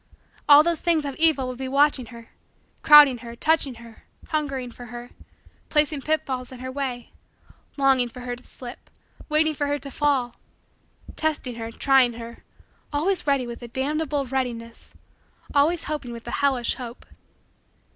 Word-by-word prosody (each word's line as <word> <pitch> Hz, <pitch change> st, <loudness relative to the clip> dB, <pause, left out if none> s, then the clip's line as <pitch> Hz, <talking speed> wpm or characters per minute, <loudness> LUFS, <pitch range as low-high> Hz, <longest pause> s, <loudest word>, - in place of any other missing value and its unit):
All 290 Hz, +1 st, +9 dB
those 340 Hz, -1 st, 0 dB
things 330 Hz, -4 st, +1 dB
of 280 Hz, -, -3 dB
evil 315 Hz, -5 st, +3 dB
would 255 Hz, 0 st, -6 dB
be 265 Hz, -, -3 dB
watching 275 Hz, -2 st, +2 dB
her, 230 Hz, -2 st, -13 dB, 0.5 s
crowding 295 Hz, -5 st, +8 dB
her, 235 Hz, 0 st, -9 dB
touching 295 Hz, -1 st, +1 dB
her, 230 Hz, -1 st, -15 dB, 0.3 s
hungering 275 Hz, -6 st, -2 dB
for 245 Hz, -, -11 dB
her; 240 Hz, +1 st, -9 dB, 0.6 s
placing 300 Hz, -1 st, +1 dB
pitfalls 265 Hz, -4 st, -2 dB
in 255 Hz, -, -9 dB
her 260 Hz, +1 st, -6 dB
way; 260 Hz, -3 st, -4 dB, 0.7 s
longing 270 Hz, -3 st, +3 dB
for 250 Hz, +2 st, -11 dB
her 245 Hz, 0 st, -4 dB
to 250 Hz, -, -14 dB
slip; 245 Hz, -2 st, -11 dB, 0.4 s
waiting 310 Hz, +1 st, +2 dB
for 290 Hz, -1 st, -2 dB
her 290 Hz, 0 st, 0 dB
to 275 Hz, 0 st, -6 dB
fall; 270 Hz, -5 st, 0 dB, 0.8 s
testing 305 Hz, -5 st, -2 dB
her, 225 Hz, -1 st, -5 dB
trying 260 Hz, 0 st, +3 dB
her, 230 Hz, 0 st, -10 dB, 0.5 s
always 320 Hz, +5 st, 0 dB
ready 275 Hz, -3 st, +2 dB
with 235 Hz, 0 st, -8 dB
a 240 Hz, -, -7 dB
damnable 285 Hz, +3 st, -2 dB
readiness; 240 Hz, -3 st, -5 dB, 0.6 s
always 305 Hz, +4 st, +3 dB
hoping 295 Hz, -5 st, -4 dB
with 235 Hz, -1 st, -9 dB
a -, -, -4 dB
hellish 265 Hz, -4 st, +1 dB
hope. 245 Hz, -2 st, -9 dB
265 Hz, 155 wpm, -24 LUFS, 245-295 Hz, 0.8 s, All